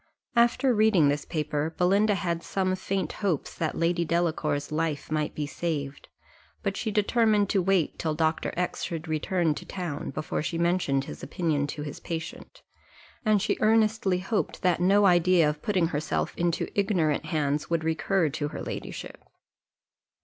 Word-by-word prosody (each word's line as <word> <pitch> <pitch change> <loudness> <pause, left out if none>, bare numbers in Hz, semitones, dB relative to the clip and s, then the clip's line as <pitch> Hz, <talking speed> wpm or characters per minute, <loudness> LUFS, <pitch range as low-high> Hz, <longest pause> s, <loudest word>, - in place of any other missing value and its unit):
After 240 +2 +4
reading 210 -9 +4
this 145 +1 -1
paper, 150 0 -2
Belinda 200 +4 +3
had 170 -2 -2
some 185 0 -1
faint 190 -2 -2
hopes 185 -8 -1
that 160 -2 -2
Lady 170 +1 +1
Delacour's 155 -4 0
life 155 -2 -2
might 155 -1 -1
be 150 - -2
saved; 145 -2 -4 0.6
but 195 -2 -1
she 220 - -2
determined 210 -1 +2
to 195 - +2
wait 185 -3 +1
till 155 -2 -1
Dr. 160 0 0
X 180 0 -1
should 165 -1 -4
return 160 +1 0
to - - -8
town, 175 -6 -5
before 155 - -3
she 165 +2 -3
mentioned 170 -6 +1
his - - -9
opinion 155 -5 -1
to 145 +1 -5
his 145 -1 -7
patient; 165 -1 -7 0.6
and 215 -3 +3
she - - 0
earnestly 215 -3 +3
hoped 195 +4 -2
that 180 -2 +2
no 200 +3 +5
idea 175 -2 +5
of 150 0 -2
putting 185 -5 +1
herself 150 -2 -2
into 170 -1 0
ignorant 175 -8 +1
hands 150 -2 -1
would 165 -1 0
recur 160 +2 +1
to 145 +1 -3
her - - -6
ladyship. - - -7
170 Hz, 160 wpm, -27 LUFS, 155-195 Hz, 0.6 s, no